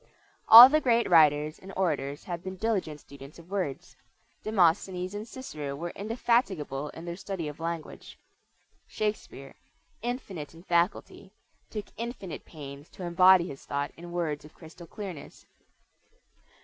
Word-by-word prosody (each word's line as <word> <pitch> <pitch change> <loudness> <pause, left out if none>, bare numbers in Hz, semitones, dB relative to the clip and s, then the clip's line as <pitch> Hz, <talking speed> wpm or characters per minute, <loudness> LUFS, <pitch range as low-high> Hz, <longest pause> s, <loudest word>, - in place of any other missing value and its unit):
All 235 +3 +13
the 305 +3 +2
great 235 -3 +2
writers 155 -2 +4
and 190 - -11
orators 145 -6 -1
have 175 -1 -6
been 190 0 -6
diligent 185 -7 -2
students 140 0 -13
of 170 +2 -16
words. 140 -9 -4 0.5
Demosthenes 185 -2 +1
and 210 +2 -6
Cicero 155 - -7
were 170 +4 -5
indefatigable 200 - -1
in 165 - -10
their 170 0 -5
study 190 -3 -5
of 150 +1 -8
language. 165 -1 -6 0.7
Shakespeare, 210 -10 -4 0.5
"infinite 200 - -5
in 165 - -14
faculty," 175 +2 -1 0.4
took 210 -2 -5
infinite 230 -7 -6
pains 140 -1 -10
to 185 - -11
embody 180 +1 +5
his 135 -4 -9
thought 140 0 -3
in 175 +1 -11
words 165 -4 -2
of 150 - -16
crystal 170 +1 -13
clearness. 185 -9 -9
175 Hz, 135 wpm, -28 LUFS, 150-200 Hz, 0.7 s, All